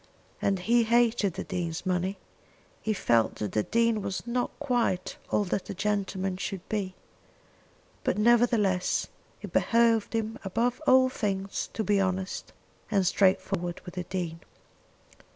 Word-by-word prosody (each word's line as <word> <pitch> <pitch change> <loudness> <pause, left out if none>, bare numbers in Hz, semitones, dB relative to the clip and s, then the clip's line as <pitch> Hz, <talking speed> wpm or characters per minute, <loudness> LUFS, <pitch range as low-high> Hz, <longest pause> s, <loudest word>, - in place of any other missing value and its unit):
And 195 -1 +2
he 235 +6 +3
hated 230 -4 +2
the - - -3
Dean's 175 -2 -3
money. 185 +1 0 0.6
He 220 - -1
felt 115 - +2
that 105 -3 -3
the 105 - +1
Dean 230 - +1
was 195 +1 -4
not 245 +1 -1
quite 245 -10 0
all 210 - +2
that 195 0 -3
a - - -4
gentleman 195 -1 -1
should 190 -1 -5
be. 195 -3 -2 1.1
But, - - 0
nevertheless, 220 -4 +3 0.3
it - - -7
behoved 230 -2 +3
him 225 +1 -2
above 230 +6 0
all 260 0 +6
things 195 -5 -2
to 220 - -1
be 205 0 +2
honest 190 0 -2 0.4
and 200 -4 +2
straightforward 185 -2 +1
with 180 - -8
the 180 -1 -4
Dean. 170 -3 -4
200 Hz, 140 wpm, -28 LUFS, 185-230 Hz, 1.1 s, all